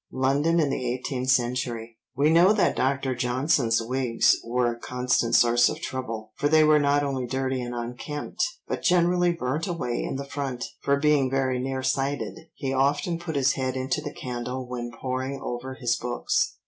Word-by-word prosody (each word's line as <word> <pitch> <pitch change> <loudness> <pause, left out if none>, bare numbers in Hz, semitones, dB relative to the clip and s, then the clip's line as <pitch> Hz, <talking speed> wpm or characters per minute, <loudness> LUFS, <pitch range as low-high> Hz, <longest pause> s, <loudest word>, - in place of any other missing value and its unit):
(London 140 +6 +2
in 145 -4 +2
the 135 - -2
Eighteenth 130 0 -3
Century.) 120 -2 0 0.2
We 145 +4 +3
know 175 +5 +6
that 210 - +2
Dr. 135 0 0
Johnson's 125 -2 +1
wigs 125 -1 +2
were 120 +1 0
a 115 - -12
constant 125 -1 0
source 120 0 +5
of - - -5
trouble, 115 -4 -5
for 145 - +1
they 155 0 +6
were 155 0 +5
not 145 0 +2
only 135 -3 -2
dirty 130 0 -1
and 120 0 -5
unkempt, 125 +8 -4 0.2
but - - -3
generally 175 0 +3
burnt 155 0 -2
away 165 -9 -2
in - - -3
the 140 +1 -4
front, 140 -3 -4 0.2
for 140 0 +2
being 145 -2 +3
very 130 -1 0
nearsighted, 135 +2 -1 0.2
he 135 -2 -3
often 145 +5 +1
put 170 -2 -5
his 140 0 +3
head 130 -1 -2
into 135 +5 -1
the 145 -1 -5
candle 125 0 -5
when 120 -1 -4
poring 130 +3 -4
over 130 +2 -5
his 120 -3 0
books. 120 +1 -1
130 Hz, 175 wpm, -26 LUFS, 125-145 Hz, 0.2 s, know